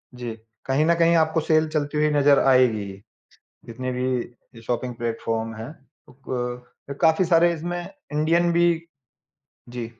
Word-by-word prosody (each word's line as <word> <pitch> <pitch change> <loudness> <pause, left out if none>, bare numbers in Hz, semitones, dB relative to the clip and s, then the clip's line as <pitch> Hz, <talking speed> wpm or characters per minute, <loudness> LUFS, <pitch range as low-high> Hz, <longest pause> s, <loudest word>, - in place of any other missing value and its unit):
जी। 120 -1 -5 0.3
कहीं 135 +3 +1
न 170 - +4
कहीं 170 0 +3
आपको 160 0 +2
सेल 155 0 +2
चलती 150 -1 -2
हुई 150 0 +3
नज़र 145 -1 +4
आएगी 125 -5 +4
ही, 100 0 -9 0.6
जितने 130 +2 -5
भी 125 0 -3 0.2
ये 120 -1 -18
शॉपिंग 125 +1 -3
प्लेटफ़ॉर्म 115 -1 -3
हैं। 110 +4 -7 0.4
ओ - - -16 0.8
क 140 - -5
काफ़ी 160 +3 +4
सारे 170 0 +4
इसमें 175 +2 -4 0.3
इंडियन 165 +3 +2
भी 170 0 +3 1.1
जी। 120 -2 -3
145 Hz, 150 wpm, -23 LUFS, 120-160 Hz, 1.1 s, न